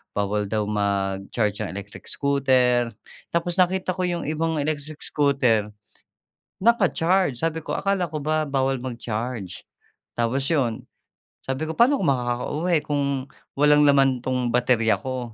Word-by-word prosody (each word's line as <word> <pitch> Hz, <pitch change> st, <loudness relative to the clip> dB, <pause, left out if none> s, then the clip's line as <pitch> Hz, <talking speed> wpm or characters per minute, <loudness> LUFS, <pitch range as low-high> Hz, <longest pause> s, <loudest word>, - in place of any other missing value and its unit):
bawal 105 Hz, 0 st, 0 dB
daw 110 Hz, -1 st, 0 dB
mag-charge 100 Hz, +1 st, -1 dB
ang 105 Hz, -, -4 dB
electric 100 Hz, +1 st, -9 dB
scooter. 130 Hz, -4 st, +2 dB, 0.4 s
Tapos 170 Hz, +1 st, 0 dB
nakita 185 Hz, 0 st, +1 dB
ko 185 Hz, -, -4 dB
'yong 175 Hz, -1 st, -2 dB
ibang 160 Hz, 0 st, -1 dB
electric 150 Hz, 0 st, -4 dB
scooter 130 Hz, -8 st, +2 dB, 0.9 s
naka-charge. 185 Hz, -, +2 dB
Sabi 160 Hz, -1 st, -1 dB
ko, -, -, -3 dB
"Akala 195 Hz, -3 st, 0 dB
ko 155 Hz, -, -3 dB
ba 155 Hz, 0 st, +1 dB
bawal 135 Hz, -1 st, 0 dB
mag-charge?" 115 Hz, -5 st, -5 dB, 0.5 s
Tapos 120 Hz, +4 st, 0 dB
'yon, 130 Hz, -8 st, 0 dB, 0.6 s
sabi 135 Hz, +4 st, -2 dB
ko, -, -, -2 dB
"Paano 265 Hz, +4 st, +5 dB
ako -, -, -2 dB
makakauwi 135 Hz, +7 st, 0 dB
kung 145 Hz, -1 st, 0 dB, 0.5 s
walang 150 Hz, 0 st, +5 dB
laman 135 Hz, -2 st, +4 dB
'tong 125 Hz, -1 st, -1 dB
baterya 120 Hz, -2 st, +2 dB
ko?" 125 Hz, -3 st, -5 dB
135 Hz, 135 wpm, -24 LUFS, 115-155 Hz, 0.9 s, Paano